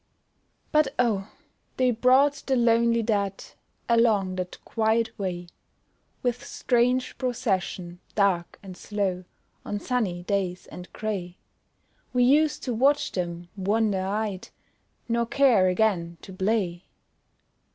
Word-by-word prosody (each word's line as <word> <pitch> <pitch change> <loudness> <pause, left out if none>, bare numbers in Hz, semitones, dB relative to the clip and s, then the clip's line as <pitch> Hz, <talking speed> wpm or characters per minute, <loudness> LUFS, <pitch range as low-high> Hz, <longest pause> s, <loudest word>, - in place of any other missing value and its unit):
But, 300 -3 +2
oh! 215 -5 0 0.5
they 255 -1 +3
brought 265 +4 +3
the 265 - +2
lonely 235 -1 +3
dead 200 -3 -1 0.4
Along 220 -5 +3
that 180 0 -4
quiet 225 0 +1
way, 180 -3 -3 0.8
With 245 +1 -1
strange 250 0 +1
procession, 195 -8 -2 0.2
dark 190 -4 +1
and 190 -2 -9
slow, 190 -3 -3 0.4
On 205 - -3
sunny 205 -8 -1
days 185 -2 -2
and 180 0 -10
grey; 190 -5 -4 0.8
We 250 -1 +3
used 295 +4 +3
to 250 - -2
watch 275 +6 +2
them, 175 -1 -4
wonder 205 0 +1
eyed, 200 0 -3 0.6
Nor 235 0 0
care 240 -9 +4
again 180 -4 +1
to 190 - -10
play. 190 -2 -1
215 Hz, 115 wpm, -26 LUFS, 185-240 Hz, 0.8 s, care